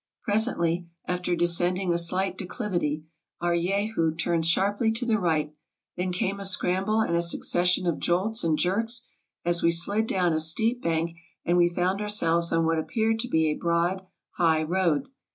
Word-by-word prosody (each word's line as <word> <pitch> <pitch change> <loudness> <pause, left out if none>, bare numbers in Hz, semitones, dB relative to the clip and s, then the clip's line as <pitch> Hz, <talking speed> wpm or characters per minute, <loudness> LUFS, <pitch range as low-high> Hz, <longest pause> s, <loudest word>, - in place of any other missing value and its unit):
Presently, 180 -6 0 0.2
after 180 0 -2
descend 175 +1 +1
ing 185 -2 -1
a - - +1
slight 185 +3 0
declivity, 175 -6 -3 0.3
our 175 0 0
Jehu 180 -2 -1
turned 165 0 0
sharply 205 +6 +2
to 235 +2 0
the 220 -3 +1
right; 155 -4 -1 0.4
then 180 +1 -2
came 190 +2 -2
a - - -6
scramble, 195 +3 +1
and 170 -6 0
a 170 - +2
succession 175 +1 +2
of 170 -3 -1
jolts 195 +6 +1
and 160 -2 +1
jerks, 225 +8 0 0.4
as 175 0 +3
we 170 - +3
slid 200 +6 +2
down 180 -5 +1
a 155 - 0
steep 225 +10 +2
bank, 165 0 -2 0.3
and 175 - +1
we 175 -1 +4
found 180 +3 -1
ourselves 170 -5 +2
on 165 0 +1
what 165 0 +1
appeared 220 +6 -1
to 245 - -2
be 160 -8 +1
a - - 0
broad 170 +3 -1 0.3
high 160 -3 +2
road. 170 -2 0
175 Hz, 175 wpm, -25 LUFS, 170-200 Hz, 0.4 s, we